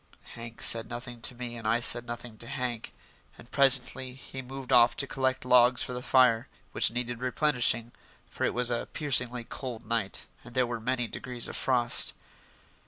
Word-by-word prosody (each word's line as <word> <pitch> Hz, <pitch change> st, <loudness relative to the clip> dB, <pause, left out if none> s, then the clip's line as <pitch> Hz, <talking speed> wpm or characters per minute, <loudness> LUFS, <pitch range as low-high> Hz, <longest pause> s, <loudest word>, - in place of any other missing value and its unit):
Hank 115 Hz, -1 st, -9 dB
said 115 Hz, -1 st, +5 dB
nothing 120 Hz, 0 st, -8 dB
to 125 Hz, -, +1 dB
me 120 Hz, -1 st, -7 dB
and 115 Hz, -, -6 dB
I 120 Hz, -, +2 dB
said 120 Hz, 0 st, +3 dB
nothing 120 Hz, -1 st, -8 dB
to 115 Hz, -, -6 dB
Hank, 125 Hz, -3 st, -5 dB, 0.5 s
and 120 Hz, -, -16 dB
presently 130 Hz, -1 st, +3 dB
he 135 Hz, 0 st, -9 dB
moved 130 Hz, 0 st, -6 dB
off 120 Hz, 0 st, +5 dB
to 140 Hz, -, -1 dB
collect 130 Hz, -1 st, -2 dB
logs 125 Hz, 0 st, +4 dB
for 125 Hz, -, -6 dB
the 125 Hz, -, -5 dB
fire, 125 Hz, -3 st, +3 dB, 0.2 s
which -, -, +2 dB
needed 120 Hz, 0 st, -4 dB
replenishing, 125 Hz, -3 st, +1 dB, 0.4 s
for -, -, -6 dB
it -, -, 0 dB
was 125 Hz, 0 st, +1 dB
a 120 Hz, -, -3 dB
piercingly 125 Hz, -5 st, 0 dB
cold 120 Hz, -2 st, -8 dB
night 115 Hz, -3 st, -2 dB, 0.2 s
and 120 Hz, -, -14 dB
there 130 Hz, -1 st, +2 dB
were 120 Hz, -1 st, -5 dB
many 125 Hz, +2 st, -2 dB
degrees 125 Hz, +1 st, -6 dB
of -, -, -8 dB
frost. 120 Hz, -3 st, +3 dB
125 Hz, 180 wpm, -28 LUFS, 120-130 Hz, 0.5 s, said